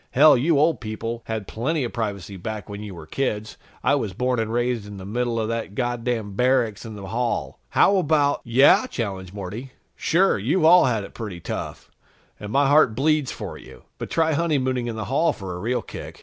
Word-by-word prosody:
"Hell, 150 Hz, +3 st, +7 dB
you 145 Hz, +5 st, +2 dB
old 155 Hz, +3 st, +2 dB
people 115 Hz, +1 st, -4 dB
had 110 Hz, -3 st, -4 dB
plenty 140 Hz, +6 st, -1 dB
of 120 Hz, -, -4 dB
privacy 100 Hz, -4 st, -4 dB
back 105 Hz, +3 st, -6 dB
when 105 Hz, 0 st, -7 dB
you 105 Hz, -3 st, -7 dB
were 80 Hz, -, -10 dB
kids. 110 Hz, 0 st, -3 dB, 0.3 s
I -, -, +3 dB
was 100 Hz, -4 st, -1 dB
born 125 Hz, +1 st, 0 dB
and 110 Hz, -1 st, -1 dB
raised 120 Hz, -2 st, -1 dB
in 105 Hz, -1 st, -9 dB
the 95 Hz, -, -8 dB
middle 120 Hz, +2 st, -1 dB
of 110 Hz, -, -1 dB
that 115 Hz, -3 st, -3 dB
goddamn 120 Hz, -3 st, -2 dB
barracks 125 Hz, -1 st, +1 dB
in 110 Hz, -2 st, -7 dB
the 100 Hz, -2 st, -8 dB
hall! 120 Hz, +2 st, -2 dB
How 200 Hz, -, +4 dB
about 150 Hz, -4 st, +2 dB
" -, -, -39 dB
"Yeah?" 145 Hz, -, +6 dB
challenged 95 Hz, -, -4 dB
Morty. 105 Hz, +7 st, -7 dB, 0.2 s
"Sure, 185 Hz, -, +2 dB
you've 155 Hz, -, +1 dB
all 175 Hz, 0 st, +7 dB
had 115 Hz, -5 st, 0 dB
it -, -, -10 dB
pretty 105 Hz, -6 st, -6 dB
tough, -, -, -6 dB, 0.5 s
and 105 Hz, 0 st, -7 dB
my 140 Hz, +3 st, +3 dB
heart 145 Hz, -6 st, +5 dB
bleeds 150 Hz, +1 st, +1 dB
for -, -, -7 dB
you. -, -, -14 dB, 0.2 s
But -, -, -5 dB
try 160 Hz, -1 st, +2 dB
honeymooning 130 Hz, -6 st, 0 dB
in 115 Hz, -, -3 dB
the 110 Hz, -1 st, -4 dB
hall 150 Hz, +4 st, +2 dB
for 95 Hz, -2 st, -7 dB
a 90 Hz, -, -6 dB
real 120 Hz, +5 st, -1 dB
kick." -, -, -9 dB
120 Hz, 210 wpm, -23 LUFS, 105-140 Hz, 0.5 s, Hell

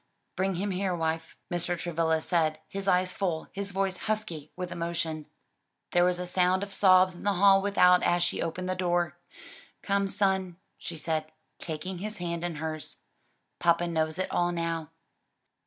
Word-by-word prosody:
"Bring 190 Hz, 0 st, 0 dB
him 200 Hz, +3 st, -1 dB
here, 185 Hz, 0 st, 0 dB
wife," 160 Hz, -1 st, -2 dB, 0.2 s
Mr. 175 Hz, 0 st, 0 dB
Travilla 160 Hz, -1 st, 0 dB
said, 155 Hz, -2 st, +1 dB
his 195 Hz, +2 st, -5 dB
eyes 185 Hz, -1 st, +3 dB
full, 175 Hz, -5 st, -2 dB
his 200 Hz, 0 st, -4 dB
voice 195 Hz, -1 st, -1 dB
husky 175 Hz, -9 st, -2 dB
with 180 Hz, -1 st, -5 dB
emotion. 165 Hz, -2 st, -2 dB, 0.6 s
There 175 Hz, -, +4 dB
was 180 Hz, 0 st, +2 dB
a 180 Hz, -, -4 dB
sound 180 Hz, +1 st, +2 dB
of 200 Hz, -1 st, -6 dB
sobs 185 Hz, -1 st, +5 dB
in 175 Hz, -, -12 dB
the 205 Hz, 0 st, +1 dB
hall 195 Hz, +1 st, +6 dB
without 180 Hz, -3 st, +5 dB
as 175 Hz, 0 st, +2 dB
she -, -, 0 dB
opened 180 Hz, +3 st, -3 dB
the 185 Hz, -, 0 dB
door. 175 Hz, -2 st, 0 dB, 0.6 s
"Come, 200 Hz, 0 st, +1 dB
son," 190 Hz, -3 st, 0 dB, 0.2 s
she 170 Hz, -, -5 dB
said, 155 Hz, 0 st, -2 dB, 0.3 s
taking 170 Hz, +3 st, -4 dB
his 210 Hz, +2 st, -5 dB
hand 170 Hz, -1 st, -3 dB
in 175 Hz, -2 st, -2 dB
hers, 155 Hz, -1 st, -5 dB, 0.6 s
"papa 170 Hz, 0 st, +3 dB
knows 160 Hz, -2 st, -1 dB
it 185 Hz, -, -2 dB
all 175 Hz, 0 st, +2 dB
now." 165 Hz, -2 st, -2 dB
175 Hz, 170 wpm, -29 LUFS, 165-190 Hz, 0.6 s, hall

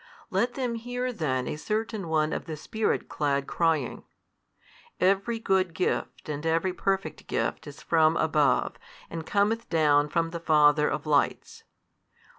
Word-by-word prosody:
Let 245 Hz, +1 st, 0 dB
them 250 Hz, -3 st, -1 dB
hear 245 Hz, +2 st, -3 dB
then 130 Hz, -, -1 dB
a -, -, -3 dB
certain 215 Hz, +1 st, -3 dB
one 155 Hz, -1 st, +1 dB
of -, -, -4 dB
the 155 Hz, -2 st, -6 dB
Spirit 220 Hz, +8 st, -1 dB
clad 140 Hz, -2 st, -1 dB
crying, 160 Hz, -7 st, 0 dB, 1.0 s
Every 195 Hz, +5 st, +2 dB
good 190 Hz, -5 st, +1 dB
gift 180 Hz, -, -2 dB
and 150 Hz, 0 st, -4 dB
every 165 Hz, +3 st, +1 dB
perfect 195 Hz, +1 st, -2 dB
gift -, -, -2 dB
is -, -, -10 dB
from, 160 Hz, 0 st, +3 dB
above, 150 Hz, -3 st, +2 dB, 0.3 s
and 165 Hz, -1 st, -6 dB
cometh 210 Hz, +3 st, +1 dB
down 150 Hz, -3 st, +3 dB
from 165 Hz, +1 st, 0 dB
the 170 Hz, -, -4 dB
Father 150 Hz, -2 st, +4 dB
of -, -, -3 dB
lights. 145 Hz, -2 st, 0 dB
165 Hz, 145 wpm, -27 LUFS, 150-205 Hz, 1.0 s, Father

